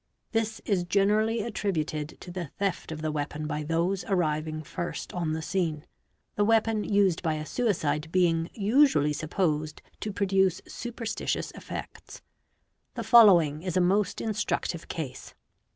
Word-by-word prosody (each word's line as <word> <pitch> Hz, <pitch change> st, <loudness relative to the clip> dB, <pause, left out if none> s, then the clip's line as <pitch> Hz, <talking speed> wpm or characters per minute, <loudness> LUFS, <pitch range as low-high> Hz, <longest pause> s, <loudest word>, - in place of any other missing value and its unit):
This 225 Hz, -1 st, -1 dB
is 195 Hz, -4 st, +1 dB
generally 210 Hz, +4 st, +2 dB
attributed 160 Hz, -9 st, -3 dB
to 180 Hz, -, -8 dB
the 175 Hz, -4 st, -5 dB
ft 195 Hz, -4 st, -2 dB
of 155 Hz, 0 st, -6 dB
the 155 Hz, -, 0 dB
weapon 150 Hz, 0 st, -3 dB
by 150 Hz, 0 st, -2 dB
those 170 Hz, +5 st, 0 dB
arriving 155 Hz, -4 st, -1 dB
first 170 Hz, +3 st, -5 dB
on 170 Hz, -3 st, -1 dB
the 160 Hz, 0 st, -3 dB
scene, 165 Hz, -4 st, -1 dB, 0.5 s
the 205 Hz, -, +1 dB
weapon 220 Hz, 0 st, +2 dB
sd 200 Hz, -4 st, +2 dB
by 160 Hz, -3 st, 0 dB
a 155 Hz, 0 st, -4 dB
suicide 160 Hz, -9 st, -1 dB
being 170 Hz, -2 st, +2 dB
usually 210 Hz, -, +4 dB
supposed 155 Hz, -1 st, -1 dB, 0.2 s
to 215 Hz, -, -3 dB
produce 190 Hz, -2 st, +2 dB
superstitious 240 Hz, -2 st, -3 dB
effects. -, -, -9 dB, 0.7 s
'The -, -, -3 dB
following 175 Hz, -, +6 dB
is 180 Hz, 0 st, -2 dB
a -, -, +5 dB
most 190 Hz, +3 st, +1 dB
instructive 210 Hz, -5 st, -2 dB
case. 150 Hz, -6 st, -6 dB
180 Hz, 140 wpm, -28 LUFS, 155-205 Hz, 0.7 s, following